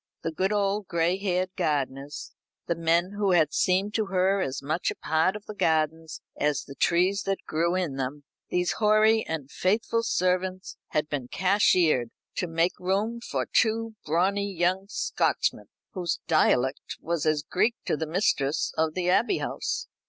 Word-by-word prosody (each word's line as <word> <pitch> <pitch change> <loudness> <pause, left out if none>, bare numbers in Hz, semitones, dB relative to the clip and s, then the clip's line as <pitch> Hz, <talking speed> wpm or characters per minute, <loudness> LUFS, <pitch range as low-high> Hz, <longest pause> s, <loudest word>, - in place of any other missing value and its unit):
The 165 - -1
good 190 +5 0
old 205 -1 0
gray 170 +1 +1
haired 185 -2 -1
gardeners 140 -1 -2 0.3
the 170 - 0
men 170 +2 +1
who 200 -3 +2
had 160 -4 +3
seemed 190 +3 +1
to 215 -1 0
her 190 +1 +2
as 135 -6 -2
much 155 +5 -1
a - - -4
part 160 +5 +1
of 210 - -8
the 215 - -7
gardens 160 -3 0
as 145 -1 0
the 140 - -10
trees 180 +7 +2
that 195 0 -2
grew 170 +3 0
in 170 -7 -2
them 135 +2 -4 0.3
these 180 0 +1
hoary 215 +1 +4
and 150 -4 -4
faithful 225 +4 +1
servants 185 -3 -1
had 150 0 -1
been 145 -5 -4
cashiered, 180 - +3 0.3
to 180 - -1
make 165 +2 0
room 200 +6 -1
for - - -2
two 225 0 +2
brawny 195 +6 +1
young 185 +2 0
Scotchmen, - - 0 0.3
whose 175 -4 -2
dialect 135 -4 +1
was 165 -1 -2
as 155 -1 +1
Greek 220 +9 +1
to - - +1
the 160 +1 -3
mistress 155 -5 0
of 160 0 0
the 180 -1 -1
Abbey 235 - +3
House. 465 - -3
180 Hz, 165 wpm, -27 LUFS, 155-195 Hz, 0.3 s, hoary